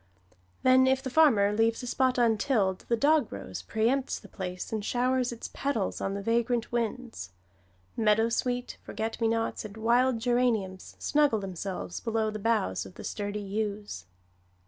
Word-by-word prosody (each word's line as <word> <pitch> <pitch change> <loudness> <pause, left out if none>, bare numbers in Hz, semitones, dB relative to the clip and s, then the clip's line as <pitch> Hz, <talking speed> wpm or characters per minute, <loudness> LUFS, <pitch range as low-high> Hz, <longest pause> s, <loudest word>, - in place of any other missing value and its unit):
Then, 260 0 +6
if 265 0 +2
the 260 - -4
farmer 230 -10 +5
leaves 225 +3 +1
a - - -4
spot 255 +1 +1
untilled, 220 -4 +1
the 235 - +1
dogrose 230 - +1
pre 220 0 0
empts 270 +1 0
the - - -13
place 180 +1 -6
and 215 -2 -2
showers 250 +2 +1
its 235 - -7
petals 250 -9 -2
on 195 - -2
the 200 - -4
vagrant 235 +1 0
winds. 235 - -3 0.6
Meadowsweet, 230 +3 +1
forget 225 +1 -4
me 225 - +3
nots 225 0 -1
and 215 0 -9
wild 240 +3 +3
geranium 230 -6 +1
snuggle 295 0 +1
themselves 190 -2 -5
below 220 -2 -1
the 215 - -5
boughs 205 - 0
of 95 - -12
the - - -9
sturdy 205 0 -3
yews. 205 - -4
225 Hz, 155 wpm, -28 LUFS, 205-250 Hz, 0.6 s, Then